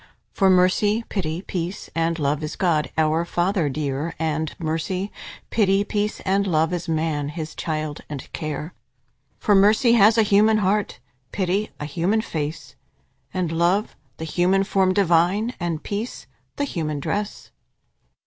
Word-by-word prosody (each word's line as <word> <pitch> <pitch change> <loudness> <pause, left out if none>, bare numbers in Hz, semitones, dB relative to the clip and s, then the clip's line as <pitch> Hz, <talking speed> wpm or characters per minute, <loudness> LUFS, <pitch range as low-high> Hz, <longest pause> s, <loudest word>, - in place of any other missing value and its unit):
For 195 -2 +3
Mercy, 190 +4 +3
Pity, 170 -2 -3
Peace, 180 +1 -4
and 165 0 0
Love, 145 -1 0
Is 150 0 -4
God 165 -5 +1
our 160 +1 +2
Father 175 -1 0
dear; 145 +2 -3
And 160 -1 -1
Mercy, 170 +5 -2 0.4
Pity, 200 -2 +3
Peace, 210 0 -2
and 195 +1 +1
Love, 165 -1 +2
Is 175 -1 -3
man, 155 -2 -1
His 155 0 -6
child 155 -2 -3
and 145 -3 -6
care. 155 +1 -4 0.6
For 210 - +2
Mercy 210 +5 +5
has 220 0 +6
a 225 - +6
human 215 +1 +4
heart; 205 0 0 0.3
Pity, 195 +2 0
a 150 - -4
human 175 +8 0
face; 155 -5 -5 0.6
And 180 -3 -1
Love, 175 +6 +1 0.2
the 160 - -5
human 180 +4 +2
form 190 -1 +2
divine: 190 +4 +2
And 170 -3 -3
Peace 210 +4 -4 0.3
the 285 - -1
human 155 - -2
dress. 205 +8 -4
175 Hz, 145 wpm, -23 LUFS, 155-200 Hz, 0.6 s, has